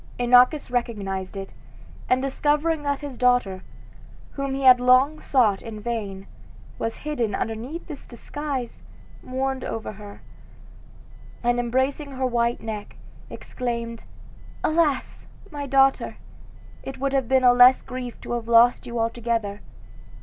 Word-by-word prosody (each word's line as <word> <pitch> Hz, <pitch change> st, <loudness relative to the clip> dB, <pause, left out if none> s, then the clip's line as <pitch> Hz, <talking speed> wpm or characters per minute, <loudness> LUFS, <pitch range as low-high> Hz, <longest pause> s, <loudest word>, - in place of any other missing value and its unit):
Inachus 250 Hz, +4 st, +4 dB
recognized 200 Hz, -6 st, -3 dB
it, 195 Hz, 0 st, -7 dB, 0.6 s
and 255 Hz, +1 st, +2 dB
discovering 295 Hz, +3 st, 0 dB
that 285 Hz, -1 st, -2 dB
his 285 Hz, -4 st, -7 dB
daughter, 245 Hz, -7 st, +2 dB, 0.7 s
whom 275 Hz, -1 st, -3 dB
he 275 Hz, -, -4 dB
had 255 Hz, -1 st, +8 dB
long 255 Hz, +5 st, +4 dB
sought 225 Hz, -8 st, +2 dB
in 225 Hz, -2 st, -8 dB
vain, 205 Hz, -4 st, -4 dB, 0.5 s
was 225 Hz, 0 st, -3 dB
hidden 240 Hz, -9 st, -1 dB
under 225 Hz, -, -2 dB, 0.2 s
this 300 Hz, -4 st, -11 dB
disguise, 265 Hz, 0 st, -5 dB, 0.4 s
mourned 265 Hz, 0 st, -3 dB
over 225 Hz, -, -4 dB
her, 205 Hz, 0 st, -12 dB, 1.2 s
and, 240 Hz, 0 st, +2 dB
embracing 260 Hz, +4 st, -1 dB
her 260 Hz, 0 st, -2 dB
white 235 Hz, -1 st, 0 dB
neck, 215 Hz, -2 st, -6 dB, 0.3 s
exclaimed, 235 Hz, -2 st, -5 dB, 0.6 s
"Alas! 310 Hz, -4 st, 0 dB, 0.2 s
my 290 Hz, -2 st, -5 dB
daughter, 270 Hz, 0 st, +2 dB, 0.6 s
it 270 Hz, -, -7 dB
would 275 Hz, +1 st, -1 dB
have 265 Hz, -3 st, 0 dB
been 260 Hz, -1 st, +3 dB
a 245 Hz, -1 st, +7 dB
less 245 Hz, +1 st, +7 dB
grief 250 Hz, -2 st, -7 dB
to -, -, -7 dB
have 235 Hz, -1 st, -3 dB
lost 235 Hz, +1 st, +5 dB
you 240 Hz, 0 st, -5 dB
altogether!" 230 Hz, -3 st, -2 dB
245 Hz, 130 wpm, -24 LUFS, 230-270 Hz, 1.2 s, had